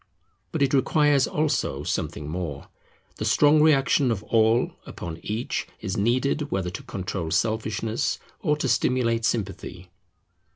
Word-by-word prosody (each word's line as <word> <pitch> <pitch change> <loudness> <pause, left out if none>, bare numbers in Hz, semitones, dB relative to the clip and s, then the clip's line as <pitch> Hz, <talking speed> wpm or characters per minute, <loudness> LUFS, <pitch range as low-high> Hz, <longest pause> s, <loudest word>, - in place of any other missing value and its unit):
But - - +1
it 135 - +1
requires 145 0 +3
also 150 - -1
something 75 -1 -3
more. 75 -3 -5 0.5
The - - -4
strong 150 +1 +5
reaction 140 -3 +4
of 105 -3 -1
All 110 +2 +3 0.2
upon 80 -2 -7
Each 110 +4 -3
is 95 -3 -3
needed, 130 +7 +1
whether 95 -2 -2
to - - -6
control 95 -3 -4
selfishness 110 +3 -1 0.2
or 150 0 +1
to 145 - -1
stimulate 115 -2 +1
sympathy. 95 -5 -3
115 Hz, 130 wpm, -25 LUFS, 95-135 Hz, 0.5 s, strong